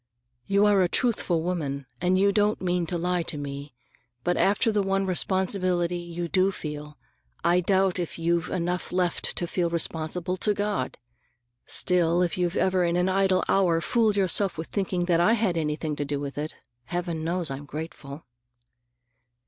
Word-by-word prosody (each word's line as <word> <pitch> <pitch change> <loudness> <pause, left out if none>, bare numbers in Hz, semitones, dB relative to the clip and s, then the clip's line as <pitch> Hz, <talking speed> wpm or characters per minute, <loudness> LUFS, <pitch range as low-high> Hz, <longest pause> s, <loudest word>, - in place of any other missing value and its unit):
You 200 +1 +4
are 205 -2 +4
a 180 - +2
truthful 185 -9 +1
woman, 145 -6 -2 0.2
and 180 +1 +3
you 200 +1 +4
don't 210 +1 +2
mean 180 -2 0
to 175 - -2
lie 180 +1 0
to 160 -2 -5
me. 140 -1 -6 0.5
But 175 - +1
after 205 +4 +2
the 210 -1 +1
one 195 0 0
responsibility 185 -1 0
you 175 0 -5
do 185 +5 +3
feel, 150 -4 -7 0.5
I 175 +1 +4
doubt 190 0 +2
if 175 - -3
you've 170 0 0
enough 180 0 -2
left 180 -1 0
to 175 - 0
feel 175 0 -1
responsible 170 +2 -2
to 210 +3 +1
God! 205 -10 -2 0.7
Still, 175 -1 +3
if 175 - 0
you've 175 -1 -1
ever 185 -1 +2
in 170 0 +1
an 180 +1 +2
idle 190 -1 +2
hour 175 -4 +3
fooled 220 +3 +2
yourself 190 -1 +1
with 160 - -5
thinking 185 -3 -1
I 175 +6 +4
had 215 -6 +1
anything 155 -1 -2
to - - -1
do 145 0 -3
with 140 -1 -5
it, 150 +2 -4 0.3
Heaven 175 0 -3
knows 170 -2 -1
I'm 135 +2 -6
grateful." 150 -1 -7
175 Hz, 170 wpm, -26 LUFS, 165-190 Hz, 0.7 s, You